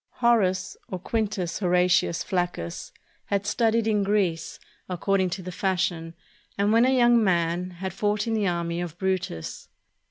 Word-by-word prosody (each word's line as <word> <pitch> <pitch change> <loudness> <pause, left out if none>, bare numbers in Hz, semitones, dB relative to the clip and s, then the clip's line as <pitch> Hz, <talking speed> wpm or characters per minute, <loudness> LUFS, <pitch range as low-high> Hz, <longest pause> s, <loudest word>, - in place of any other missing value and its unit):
Horace, 195 -6 +2
or 185 - -3
Quintus 200 -2 -2
Horatius 180 -2 +2
Flaccus, 175 - -3 0.3
had 200 0 -1
studied 225 +1 +1
in 215 -2 +2
Greece, 195 -5 0 0.3
according 185 +1 +1
to 185 +1 -5
the 180 - -6
fashion, 175 -3 -1 0.4
and 205 +2 +2
when 230 +2 +5
a 260 0 +3
young 240 -2 +5
man, 175 -1 +1
had 185 +1 -6
fought 205 +1 0
in 225 - -1
the 210 -3 +1
army 170 -1 -1
of 175 -1 -6
Brutus. 185 - -3
190 Hz, 150 wpm, -25 LUFS, 175-210 Hz, 0.4 s, when